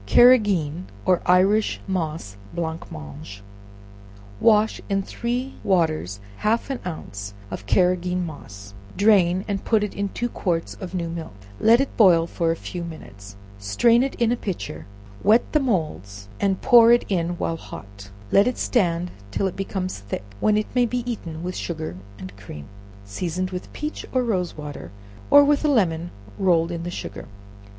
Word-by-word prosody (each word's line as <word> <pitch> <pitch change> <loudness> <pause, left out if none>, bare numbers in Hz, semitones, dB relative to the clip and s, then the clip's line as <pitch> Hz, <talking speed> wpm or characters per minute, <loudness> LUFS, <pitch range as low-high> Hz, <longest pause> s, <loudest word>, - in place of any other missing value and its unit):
Carrageen 190 - +4 0.2
or 185 -1 +3
Irish 195 +4 +3
Moss 160 - -3 0.2
Blancmange. 100 - -6 1.0
Wash 215 -1 +3
in 195 -1 +1
three 245 +6 -3
waters 155 - +1 0.2
half 230 +5 0
an 265 - -3
ounce 100 - -7 0.2
of 95 +1 -7
Carrageen 180 - +2
moss; 100 -10 -10 0.2
drain 190 -3 +4
and 200 -2 -2
put 220 -2 +2
it 210 - -3
in 200 0 -2
two 240 - -2
quarts 175 -8 -2
of 185 -1 -6
new 170 -2 -2
milk, 165 -9 -6 0.2
let 230 +2 +6
it 275 - -1
boil 175 -6 +6
for 170 0 -1
a 165 - +2
few 175 +1 -6
minutes, 100 -12 -10 0.2
strain 230 - +3
it 270 +1 -1
in 235 -1 +1
a - - +2
pitcher, 130 - -5 0.3
wet 215 +4 +5
the 305 - +5
moulds, 155 - -2
and 195 -2 0
pour 235 -2 +7
it 240 - +4
in 175 -2 -1
while 165 - -2
hot; 100 -8 -11 0.2
let 200 +3 +5
it 250 - -1
stand 175 -6 0 0.2
till 105 - -1
it 190 - -2
becomes 190 - -3
thick, 100 -1 -5 0.2
when 210 0 +3
it 215 - 0
may 245 -1 +3
be 245 +1 -2
eaten 170 -9 -5
with 180 +1 -4
sugar 160 - -4 0.2
and 95 0 -9
cream, 75 -8 -9 0.4
seasoned 180 - -3
with 180 -1 -6
peach 300 +1 -5
or 255 -1 +1
rose 185 -9 -1
water, 145 - -7 0.4
or 285 - +8
with 290 +1 +2
a - - +3
lemon 175 - +1 0.3
rolled 170 -3 +3
in 170 -1 -4
the 175 - -4
sugar. 100 - -7
180 Hz, 165 wpm, -23 LUFS, 155-215 Hz, 1.0 s, or